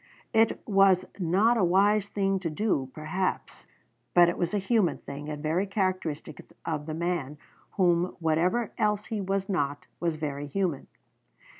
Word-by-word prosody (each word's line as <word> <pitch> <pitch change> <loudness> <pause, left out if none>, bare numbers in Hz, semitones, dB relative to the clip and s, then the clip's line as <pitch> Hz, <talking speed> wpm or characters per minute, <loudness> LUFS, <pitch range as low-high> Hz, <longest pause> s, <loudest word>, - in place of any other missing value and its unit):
It 225 0 +2
was 195 -3 +4
not 195 +7 +3
a 210 - +2
wise 200 +3 +3
thing 195 -1 0
to 175 -3 -3
do, 155 -6 -1
perhaps, 160 +6 -3 0.5
but 175 -1 +7
it 170 - -2
was 175 - -1
a 210 - 0
human 200 -1 +1
thing, 145 +2 -8
and 150 0 -6
very 170 +6 0
characteristic 185 -6 -2 0.2
of 150 -2 -3
the 155 - -3
man, 165 -4 -2 0.4
who, 175 -2 +2
whatever 175 +8 +1
else 210 -1 +1
he 215 -2 -3
was 195 0 -1
not, 145 -7 -1
was 170 -2 0
very 145 -2 -4
human. 170 -2 -2
180 Hz, 155 wpm, -28 LUFS, 155-195 Hz, 0.5 s, but